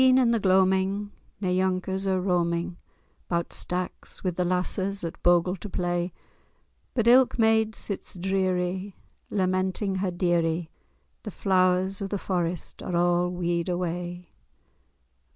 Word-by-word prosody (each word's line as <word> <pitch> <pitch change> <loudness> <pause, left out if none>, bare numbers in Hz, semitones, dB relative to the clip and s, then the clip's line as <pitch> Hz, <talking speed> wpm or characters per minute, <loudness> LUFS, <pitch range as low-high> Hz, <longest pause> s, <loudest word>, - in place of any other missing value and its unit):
At - - +7
e'en, 255 0 +6
in 250 -3 +4
the 230 - +2
gloaming, 190 +1 +2 0.3
nae 190 - 0
younkers 190 +1 0
are 190 -1 +2
roaming 175 -2 0 0.5
'Bout 170 -1 -1
stacks 180 0 -4
with 180 -3 -1
the 180 - +1
lasses 185 +2 -1
at 165 - -5
bogle 175 +1 +3
to 210 - -7
play; 175 -1 -1 0.8
But 230 -3 +1
ilk 250 +1 +6
maid 220 -1 +3
sits 200 - -5
dreary, 185 +1 -1 0.3
lamenting 190 0 0
her 190 0 0
deary— 175 -2 0 0.5
The 215 - -6
Flowers 185 0 +1
of 195 - -3
the 205 - -1
Forest 175 -3 -3
are 180 - -3
a' 175 0 +2
wede 175 0 -1
away. 175 0 -3
185 Hz, 135 wpm, -26 LUFS, 175-195 Hz, 0.8 s, At